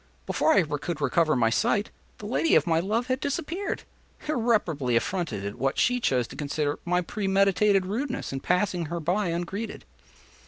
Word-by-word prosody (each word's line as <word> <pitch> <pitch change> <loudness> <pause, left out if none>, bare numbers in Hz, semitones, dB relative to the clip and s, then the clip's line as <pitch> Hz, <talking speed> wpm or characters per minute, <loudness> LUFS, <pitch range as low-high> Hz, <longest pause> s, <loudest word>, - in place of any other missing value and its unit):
Before - - +2
I 190 - +5
could 150 +2 -4
recover 155 +2 +2
my 115 -3 +2
sight, 205 - +1 0.3
the 210 - -9
lady 255 +9 +2
of - - +4
my 165 -2 +2
love 215 +7 0
had 255 +1 -1
disappeared—irreparably 240 - -2
affronted 155 - -1
at 100 +4 -6
what 135 +2 0
she 250 0 +2
chose 125 - +1
to - - -10
consider 145 0 -2
my 180 +1 +2
premeditated 195 +1 +2
rudeness 250 - -3
in 135 - -2
passing 180 0 0
her 170 +2 -3
by 180 +5 0
ungreeted. 175 +6 -4
180 Hz, 160 wpm, -26 LUFS, 150-215 Hz, 0.3 s, I